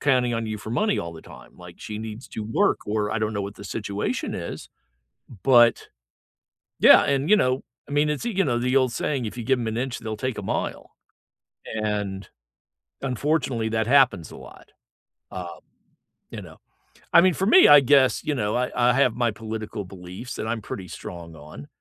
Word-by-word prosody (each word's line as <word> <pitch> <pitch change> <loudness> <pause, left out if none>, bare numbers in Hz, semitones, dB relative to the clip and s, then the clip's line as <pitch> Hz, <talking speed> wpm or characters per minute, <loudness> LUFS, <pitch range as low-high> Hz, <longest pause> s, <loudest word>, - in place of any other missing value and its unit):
counting 125 -4 +2
on 115 -1 -2
you 110 -1 -4
for 110 - -8
money 210 - +1
all 85 - -5
the 80 - -12
time, - - -15
like, - - -13
she 105 -1 -7
needs 110 +2 -8
to 110 - -6
work, 110 - +1
or 105 0 -1
I 115 - -1
don't 110 0 -1
know 100 -1 -2
what 100 +1 -7
the 100 - -11
situation 100 0 -3
is, - - -6 0.8
but 120 -3 +5 0.9
yeah, - - +8
and, 140 +4 0
you 210 - +7
know 130 -8 +1 0.3
I 145 - -9
mean, 150 +1 +2
it's 150 +8 -3
you 195 -5 +1
know, 120 -5 0
the 125 +2 0
old 130 -3 +3
saying, 135 -2 -2
"If 110 +3 -6
you 120 - -5
give 130 +2 +2
'em 120 - -3
an 110 +1 -2
inch, 130 -1 -3
they'll 110 -1 -5
take 130 +2 -3
a - - -4
mile." - - -4 0.9
And, 105 -3 -3 0.7
unfortunately, 130 -3 -1
that 110 -1 0
happens 125 - +3
a - - -11
lot, - - -14 0.6
um, 90 -2 -7 0.7
you - - -7
know? - - -13 0.6
I - - +8
mean, 185 0 +4
for 190 - -1
me, 365 - +7
I 145 - +9
guess, 135 0 +3
you 150 - -1
know, 105 -4 -1
I 125 +1 -1
I 125 0 +3
have 125 -3 +2
my 120 -1 +1
political 110 -1 -6
beliefs 90 +6 -9
that 110 - -5
I'm 110 0 -2
pretty 95 -2 -7
strong 85 -2 -9
on. 75 -1 -12
115 Hz, 200 wpm, -24 LUFS, 105-130 Hz, 0.9 s, I